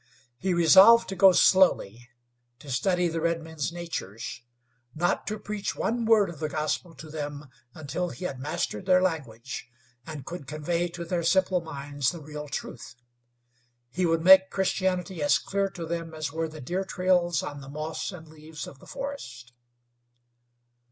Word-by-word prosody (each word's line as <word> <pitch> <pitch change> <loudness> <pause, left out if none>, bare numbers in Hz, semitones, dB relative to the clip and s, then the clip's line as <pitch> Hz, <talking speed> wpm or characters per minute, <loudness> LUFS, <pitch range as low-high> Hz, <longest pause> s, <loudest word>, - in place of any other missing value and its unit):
He 185 -1 0
resolved 195 +8 +7
to 195 - -4
go 190 +1 +7
slowly; 120 - +3 0.5
to 140 +1 -10
study 180 +7 +1
the 165 -1 -3
redmen's 165 -2 -2
natures; 145 - -6 0.5
not 175 +3 0
to 215 +1 -2
preach 210 -1 -4
one 235 +1 -1
word 220 -3 +5
of 160 - -12
the 155 - -2
gospel 155 +3 -2
to 150 +3 -10
them 145 -1 -5 0.3
until 160 +4 -3
he 180 - -7
had 135 -7 -4
mastered 150 +6 -3
their 185 -1 +6
language 135 -8 -4 0.4
and 150 -4 -7
could 170 -3 -7
convey 170 +3 -1
to 170 0 -7
their 170 0 -1
simple 185 +1 +2
minds 145 -3 -2
the 170 - -6
real 150 0 -8
truth. 120 -4 -7 1.0
He 180 +5 0
would 165 0 +1
make 190 +1 +8
Christianity 185 -2 -1
as 145 - +4
clear 200 0 -1
to 175 -3 -7
them 165 -1 -4
as 155 -2 -3
were 165 0 -1
the 155 -1 -10
deer 180 +9 -2
trails 180 -4 +1
on 145 -1 -6
the 135 - -10
moss 155 +5 -4
and 165 -4 -11
leaves 155 0 -9
of 135 - -12
the - - -16
forest. 125 - -7
165 Hz, 165 wpm, -27 LUFS, 150-185 Hz, 1.0 s, make